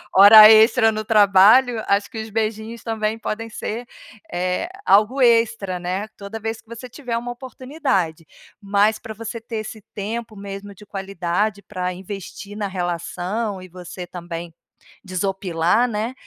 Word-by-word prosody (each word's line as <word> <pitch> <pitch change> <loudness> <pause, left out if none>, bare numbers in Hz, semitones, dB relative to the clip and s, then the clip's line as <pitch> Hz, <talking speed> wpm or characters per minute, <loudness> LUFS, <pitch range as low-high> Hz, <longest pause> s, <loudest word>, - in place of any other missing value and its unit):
hora 215 +2 +10
extra 225 +1 +6
no 215 0 -3
trabalho, 215 +3 +5
acho 200 +1 +2
que 230 - -7
os 220 - -8
beijinhos 220 +1 -3
também 220 -1 -2
podem 225 0 -4
ser, 225 +2 -5 0.5
eh, 180 - -2 0.2
algo 215 +7 +4
extra, 230 -5 +2
né, 180 +4 -3
toda 200 +2 -8
vez 225 +1 -4
que - - -44
você 235 +2 -8
tiver 245 -2 -5
uma 240 +1 -4
oportunidade. 250 - -3 0.4
Mas 205 +2 +2
pra 220 0 -9
você 225 +1 -7
ter 230 0 -6
esse 215 0 -7
tempo 220 +1 -5
mesmo 200 0 -8
de 210 +2 -16
qualidade 195 +1 -2
pra 180 -1 -4
investir 195 +2 -8
na 210 -1 -3
relação 175 -2 -4 0.4
e 185 - -11
você 180 0 -9
também 170 -1 -7 0.5
desopilar, 190 +2 0
né, 225 +2 -3
210 Hz, 150 wpm, -21 LUFS, 190-225 Hz, 0.5 s, hora